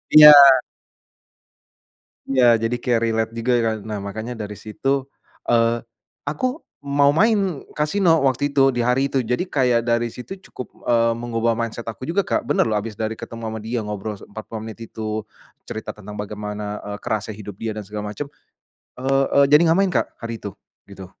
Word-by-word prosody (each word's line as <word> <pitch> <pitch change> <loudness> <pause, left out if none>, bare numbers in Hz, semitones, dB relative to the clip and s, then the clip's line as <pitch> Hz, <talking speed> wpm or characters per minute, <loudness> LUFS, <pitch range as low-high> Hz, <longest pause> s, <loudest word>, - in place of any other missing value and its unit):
iya. 150 0 +12 2.0
Iya 125 -3 +5
jadi 115 +2 0
kaya 120 0 +1
relate 115 0 0
juga 115 +2 0
kan, 110 - +1
nah 105 0 -5
makanya 110 +4 -6
dari 105 - -7
situ, 135 +7 -2 0.4
eee, 115 0 +3 0.4
aku 255 - -2 0.2
mau 140 0 +3
main 195 -3 +1
Kasino 165 +1 +3
waktu 140 +2 0
itu 135 -1 +5
di 120 -2 -1
hari 135 +3 +2
itu, 130 -3 0
jadi 125 +6 0
kayak 125 -4 +2
dari 120 0 +2
situ 190 +10 -8
cukup, 125 - -11
eee, 115 -1 +3
mengubah 115 -1 -1
mindset 115 0 -4
aku 130 +3 -7
juga 175 +6 +1
Kak, - - -2
bener - - +1
loh 105 - +1
habis 105 +1 -4
dari 110 +1 -4
ketemu 115 0 -8
sama 110 0 -5
dia 115 +2 -3
ngobrol 105 -1 -5
45 110 +1 -8
menit 110 - -10
itu, 110 -1 -5 0.4
cerita 110 - -6
tentang 105 0 -10
bagaimana, 105 0 -5 0.2
eee, - - -5
kerasnya 110 0 -3
hidup 105 -2 -9
dia 110 0 -3
dan 105 - -5
segala 105 +1 -5
macam, 140 +5 -6 0.7
eee 135 +1 +2
eee, 140 - +7
jadi 150 +1 +7
enggak 165 - +3
main, 195 -1 +3
Kak, - - +2
hari 115 0 -5
itu 100 - -4 0.4
gitu. 95 -1 -9
115 Hz, 175 wpm, -22 LUFS, 110-135 Hz, 2.0 s, iya